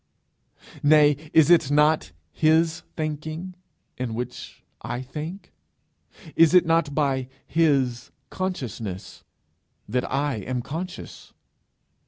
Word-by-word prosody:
nay, 150 Hz, 0 st, +6 dB, 0.2 s
is 160 Hz, +1 st, +5 dB
it 165 Hz, -6 st, +5 dB
not 150 Hz, -5 st, +3 dB, 0.2 s
his 160 Hz, -, +2 dB, 0.2 s
thinking 155 Hz, +3 st, -4 dB, 0.5 s
in 120 Hz, -3 st, -3 dB
which 125 Hz, +1 st, -7 dB, 0.2 s
I 125 Hz, -, -4 dB
think? 155 Hz, +9 st, -7 dB, 0.8 s
is 165 Hz, +2 st, +5 dB
it 180 Hz, -, +6 dB
not 165 Hz, -3 st, +1 dB
by 135 Hz, -4 st, 0 dB, 0.2 s
his 135 Hz, -7 st, +1 dB, 0.2 s
consciousness 120 Hz, -, -5 dB, 0.6 s
that 125 Hz, +3 st, -2 dB
I 140 Hz, -1 st, 0 dB
am 120 Hz, +4 st, -3 dB
conscious? 175 Hz, +7 st, -7 dB
150 Hz, 100 wpm, -24 LUFS, 130-165 Hz, 0.8 s, nay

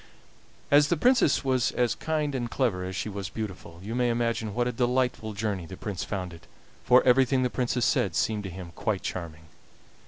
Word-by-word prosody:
As 145 Hz, 0 st, +6 dB
the 175 Hz, -, +1 dB
Princess 245 Hz, -, +3 dB
was 130 Hz, -2 st, +2 dB
as 120 Hz, -1 st, +1 dB
kind 155 Hz, -2 st, -2 dB
and 120 Hz, -3 st, -2 dB
clever 115 Hz, -10 st, 0 dB
as 95 Hz, 0 st, -5 dB
she 95 Hz, -, -3 dB
was 100 Hz, -2 st, -5 dB
beautiful, 95 Hz, -6 st, -7 dB
you 110 Hz, +3 st, -5 dB
may 125 Hz, 0 st, +1 dB
imagine 115 Hz, -3 st, -1 dB
what 120 Hz, 0 st, +1 dB
a -, -, 0 dB
delightful 125 Hz, -2 st, 0 dB
journey 100 Hz, -4 st, -3 dB
the 95 Hz, -, -9 dB
Prince 100 Hz, -3 st, -4 dB
found 90 Hz, -3 st, -4 dB
it, 85 Hz, -, -14 dB, 0.4 s
for 125 Hz, +1 st, +6 dB
everything 130 Hz, +1 st, +4 dB
the 125 Hz, -, 0 dB
Princess 125 Hz, -1 st, 0 dB
said 95 Hz, -4 st, +1 dB
seemed 105 Hz, +6 st, 0 dB
to -, -, -4 dB
him 90 Hz, -1 st, -8 dB
quite 100 Hz, +2 st, -2 dB
charming. 80 Hz, -3 st, -6 dB
115 Hz, 195 wpm, -27 LUFS, 95-125 Hz, 0.4 s, As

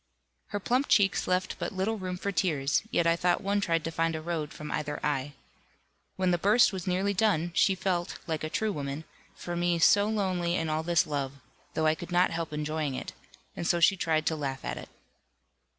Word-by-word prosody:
Her 205 Hz, -, -3 dB
plump 250 Hz, +7 st, +1 dB
cheeks 195 Hz, -3 st, +3 dB
left 185 Hz, 0 st, 0 dB
but -, -, -2 dB
little 200 Hz, +3 st, -1 dB
room 185 Hz, -1 st, -4 dB
for 200 Hz, +2 st, -2 dB
tears, 150 Hz, -8 st, +1 dB
yet 170 Hz, -7 st, +1 dB
I 165 Hz, 0 st, +4 dB
thought 175 Hz, +1 st, +1 dB
one 200 Hz, +1 st, +1 dB
tried 165 Hz, -4 st, +1 dB
to 165 Hz, -, -3 dB
find 165 Hz, 0 st, 0 dB
a 160 Hz, -, -4 dB
road 160 Hz, -3 st, -3 dB
from 150 Hz, -, -7 dB
either 145 Hz, -1 st, -3 dB
eye. 145 Hz, -1 st, -1 dB, 0.8 s
When 185 Hz, -1 st, +1 dB
the 175 Hz, -, +1 dB
burst 210 Hz, +4 st, +5 dB
was 185 Hz, -2 st, -5 dB
nearly 190 Hz, +3 st, +1 dB
done, 185 Hz, -5 st, +1 dB
she 190 Hz, +2 st, +3 dB
felt 180 Hz, -1 st, -2 dB
(like 160 Hz, -3 st, -3 dB
a 155 Hz, -, -2 dB
true 220 Hz, +6 st, 0 dB
woman) 145 Hz, -2 st, -4 dB, 0.3 s
for 175 Hz, -, -5 dB
me 175 Hz, 0 st, +1 dB
so 205 Hz, +5 st, +5 dB
lonely 185 Hz, -5 st, 0 dB
in 165 Hz, -3 st, -1 dB
all 155 Hz, +1 st, 0 dB
this 170 Hz, +1 st, +2 dB
love, 140 Hz, -3 st, -2 dB, 0.4 s
though 160 Hz, -, +1 dB
I 155 Hz, -, +5 dB
could 175 Hz, +3 st, -8 dB
not 175 Hz, +1 st, +3 dB
help 165 Hz, -1 st, -3 dB
enjoying 150 Hz, -2 st, -2 dB
it; -, -, -6 dB, 0.4 s
and 170 Hz, -, -3 dB
so 175 Hz, -, +2 dB
she 180 Hz, +4 st, +5 dB
tried 160 Hz, -4 st, 0 dB
to 160 Hz, -, +1 dB
laugh 135 Hz, -3 st, -4 dB
at -, -, -3 dB
it. -, -, -9 dB
170 Hz, 215 wpm, -29 LUFS, 155-190 Hz, 0.8 s, burst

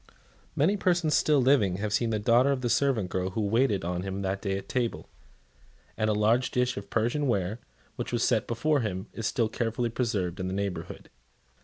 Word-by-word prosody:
Many 185 Hz, +9 st, +2 dB
persons 175 Hz, -5 st, +1 dB
still 150 Hz, -2 st, +3 dB
living 125 Hz, -9 st, +3 dB
have 105 Hz, +1 st, -3 dB
seen 115 Hz, +2 st, +1 dB
the 110 Hz, -, 0 dB
daughter 120 Hz, +6 st, +3 dB
of 135 Hz, -2 st, -1 dB
the 120 Hz, -2 st, 0 dB
servant 120 Hz, -8 st, +1 dB
girl 95 Hz, 0 st, -1 dB
who 100 Hz, +4 st, -3 dB
waited 105 Hz, -2 st, +1 dB
on 90 Hz, 0 st, -2 dB
him 95 Hz, +1 st, -4 dB
that 95 Hz, +1 st, -2 dB
day 95 Hz, -2 st, -1 dB
at 95 Hz, 0 st, -8 dB
table; 120 Hz, -2 st, -2 dB, 0.9 s
and 110 Hz, -, 0 dB
a -, -, +3 dB
large 115 Hz, +4 st, +2 dB
dish 125 Hz, 0 st, 0 dB
of 100 Hz, -, -7 dB
Persian 120 Hz, +6 st, 0 dB
ware, 100 Hz, -1 st, -1 dB, 0.4 s
which -, -, -4 dB
was 120 Hz, 0 st, 0 dB
set 115 Hz, -3 st, +1 dB
before 145 Hz, +6 st, +1 dB
him, 95 Hz, -5 st, -3 dB
is 115 Hz, -2 st, -3 dB
still 115 Hz, -3 st, +1 dB
carefully 115 Hz, +1 st, -2 dB
preserved 105 Hz, -7 st, -2 dB
in 95 Hz, -, -2 dB
the 95 Hz, -, -3 dB
neighbourhood. 95 Hz, -4 st, -5 dB
115 Hz, 200 wpm, -28 LUFS, 100-125 Hz, 0.9 s, still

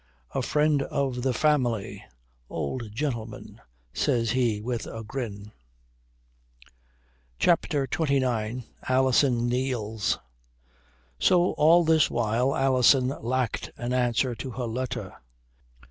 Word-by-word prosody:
"A -, -, 0 dB
friend 150 Hz, -1 st, +2 dB
of 135 Hz, -2 st, -2 dB
the 130 Hz, +1 st, +1 dB
family, 125 Hz, -6 st, 0 dB, 0.5 s
old 110 Hz, -, -4 dB
gentleman," 115 Hz, -3 st, -5 dB, 0.3 s
says 115 Hz, -3 st, +1 dB
he 120 Hz, -4 st, +1 dB
with 120 Hz, +1 st, -4 dB
a 115 Hz, 0 st, -7 dB
grin. 105 Hz, -4 st, -6 dB, 1.9 s
CHAPTER 155 Hz, -5 st, +2 dB
XXIX 125 Hz, -5 st, -1 dB, 0.3 s
ALISON 130 Hz, -2 st, +3 dB
KNEELS 120 Hz, -4 st, -1 dB, 1.0 s
So 175 Hz, -, +4 dB
all 165 Hz, +3 st, +5 dB
this 160 Hz, -1 st, +4 dB
while 120 Hz, +3 st, 0 dB
Alison 130 Hz, -1 st, +4 dB
lacked 125 Hz, 0 st, -1 dB
an 120 Hz, +1 st, -3 dB
answer 125 Hz, 0 st, +1 dB
to 130 Hz, +3 st, -6 dB
her 125 Hz, +1 st, -4 dB
letter. 125 Hz, +2 st, -4 dB
125 Hz, 100 wpm, -26 LUFS, 115-135 Hz, 1.9 s, all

